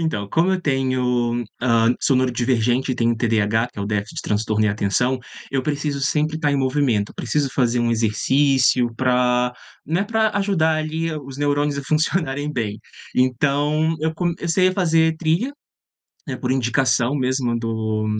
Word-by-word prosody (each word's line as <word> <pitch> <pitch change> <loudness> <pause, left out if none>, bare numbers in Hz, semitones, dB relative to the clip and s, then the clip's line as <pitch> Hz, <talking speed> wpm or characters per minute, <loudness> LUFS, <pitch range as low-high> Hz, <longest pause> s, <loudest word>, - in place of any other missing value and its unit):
Então, 105 -12 -2
como 175 +3 +2
eu 185 - 0
tenho 125 -4 0 0.2
hã, 115 -1 +3
sou 135 - +2
neurodivergente 125 0 +1
e - - -2
tenho 115 -1 +1
TDAH, 110 0 +1
que - - -12
é - - -2
o - - -3
déficit 105 -1 -3
de - - -4
transtorno 110 +1 0
em - - +3
atenção, 115 +6 0 0.3
eu 135 -1 0
preciso 145 -1 -2
sempre 150 +3 0
estar 145 -3 0
em - - +1
movimento, 130 -6 0
preciso 145 -2 -1
fazer 120 -2 +1
um 120 0 +1
exercício 125 +2 +2
para 125 0 +1 0.3
né, 175 +6 0
para 220 0 +1
ajudar 165 -6 +1
ali 160 +1 -2
os 135 -2 -8
neurônios 145 0 0
a - - -3
funcionarem 150 -1 -1
bem. 110 -4 -3 0.4
Então 145 +5 +1
eu 160 0 -1
comecei 175 +1 +1
a - - -1
fazer 160 -3 +2
trilha, 170 - 0 0.7
né, 130 -3 -4
por 125 - -3
indicação 130 0 +1
mesmo 130 -3 0
do 110 -1 -2
130 Hz, 160 wpm, -21 LUFS, 120-155 Hz, 0.7 s, hã